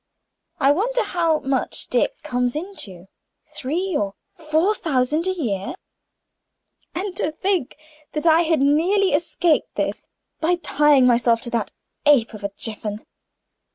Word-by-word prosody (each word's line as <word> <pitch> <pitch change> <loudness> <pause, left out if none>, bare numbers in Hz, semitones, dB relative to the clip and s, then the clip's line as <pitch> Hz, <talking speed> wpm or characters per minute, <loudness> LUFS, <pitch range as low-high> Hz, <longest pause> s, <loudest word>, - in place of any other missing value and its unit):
I 275 -1 +5
wonder 485 +11 +1
how 330 -3 0
much 270 -1 -1
Dick - - -1
comes 245 0 -1
into 300 - -7 0.5
three 340 +7 -2
or 200 -6 -1 0.2
four 320 +5 +1
thousand 305 -1 0
a 375 -1 -1
year? 200 - -2 1.2
And 370 +1 -3
to 305 - 0
think 355 -4 -1 0.4
that 305 +1 -3
I 325 0 +6
had 320 -4 +1
nearly 350 +7 +3
escaped 330 +1 +1
this - - -2 0.4
by 340 +3 +2
tying 295 -5 +3
myself 235 -1 +3
to 240 - -5
that 235 - -1 0.4
ape 255 -6 +4
of 210 -1 -10
a 200 - -1
Jiffin! 215 -1 -6
300 Hz, 135 wpm, -22 LUFS, 245-350 Hz, 1.2 s, I